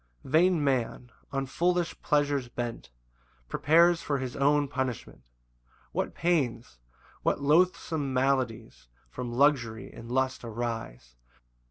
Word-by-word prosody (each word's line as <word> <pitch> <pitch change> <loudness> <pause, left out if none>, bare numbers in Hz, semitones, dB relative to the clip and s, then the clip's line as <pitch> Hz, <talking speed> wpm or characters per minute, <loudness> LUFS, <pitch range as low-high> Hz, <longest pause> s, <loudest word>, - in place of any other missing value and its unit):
1 - - -11
Vain 170 0 +4
man, 125 -2 -1 0.2
on 135 -1 -1
foolish 175 +5 0
pleasures 145 -4 +1
bent, 120 - -5 0.6
Prepares 170 - +4
for 145 -3 -1
his 130 -2 -5
own 145 +1 +3
punishment; 130 - -4 0.7
What - - -2
pains, 125 - -1 0.4
what - - +1
loathsome 155 -2 +2
maladies 125 - -1 0.2
From 120 - -5
luxury 120 -4 +1
and 115 - -10
lust 130 0 0
arise! 115 - -5
130 Hz, 115 wpm, -28 LUFS, 120-150 Hz, 0.7 s, Vain